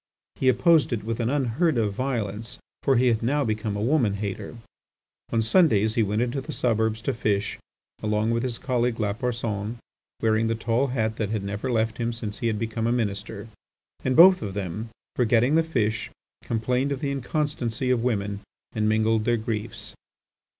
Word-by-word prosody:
He 130 - +3
opposed 145 +6 +4
it 115 -4 -2
with 115 +1 -3
an 115 0 0
unheard 140 +2 +1
of 105 -3 +1
violence, 115 -2 -3 0.2
for 135 - +3
he 125 +1 +3
had 115 -2 +1
now 140 +5 +1
become 110 -1 -2
a 105 - -2
woman 120 -6 +2
hater. 100 +3 -5 0.7
On 115 -1 +2
Sundays 110 - +4
he 115 - +2
went 105 +2 +1
into 125 +3 -2
the - - -7
suburbs 110 -2 0
to 135 - 0
fish 105 -3 -1 0.4
along 105 +1 +1
with 115 0 +1
his 125 -2 -2
colleague 125 -3 0
Lapersonne, 110 0 -2 0.4
wearing 110 0 +2
the 115 - 0
tall 115 +4 +1
hat 110 -4 -1
that 110 0 -1
never 105 +6 -3
left 110 -1 0
him 120 0 -1
since 105 -3 -6
he 115 - 0
had 110 -2 0
become 115 0 -2
a - - +2
Minister. 105 -2 -2 0.6
And 130 -1 +1
both 185 +4 +8
of 100 -3 -5
them, 100 +3 -4 0.3
forgetting 120 +2 +3
the 165 - +5
fish, 115 -10 -1 0.3
complained 125 +4 0
of 140 - -2
the 140 - -1
inconstancy 135 -3 -1
of 120 -2 +1
women 100 -4 -1 0.3
and 110 -1 +1
mingled 110 0 +2
their 120 0 +2
griefs. 110 -1 -4
115 Hz, 180 wpm, -25 LUFS, 110-125 Hz, 0.7 s, both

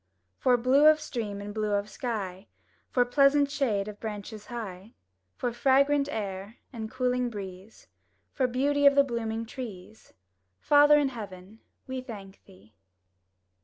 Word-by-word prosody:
For 250 -1 +4
blue 265 +5 +5
of 310 0 +6
stream 210 -8 -5
and 205 0 -7
blue 215 -1 -1
of 200 0 0
sky; 205 -5 -5 0.4
For 245 -1 +2
pleasant 280 +2 +4
shade 230 -9 0
of 210 -1 -8
branches 215 0 -7
high; 215 -3 -7 0.4
For 245 -1 -2
fragrant 280 +3 +3
air 200 -3 -5 0.2
and 220 -2 -5
cooling 250 0 0
breeze; 195 -1 -9 0.5
For 260 -3 +1
beauty 285 +3 +2
of 280 - +6
the 280 - +6
blooming 230 -3 -3
trees, 220 -4 -9 0.5
Father 295 0 +6
in 290 -2 +2
heaven, 205 -3 -9 0.3
we 260 0 -4
thank 200 -6 -10
Thee! 100 +4 -19
230 Hz, 140 wpm, -28 LUFS, 205-265 Hz, 0.5 s, of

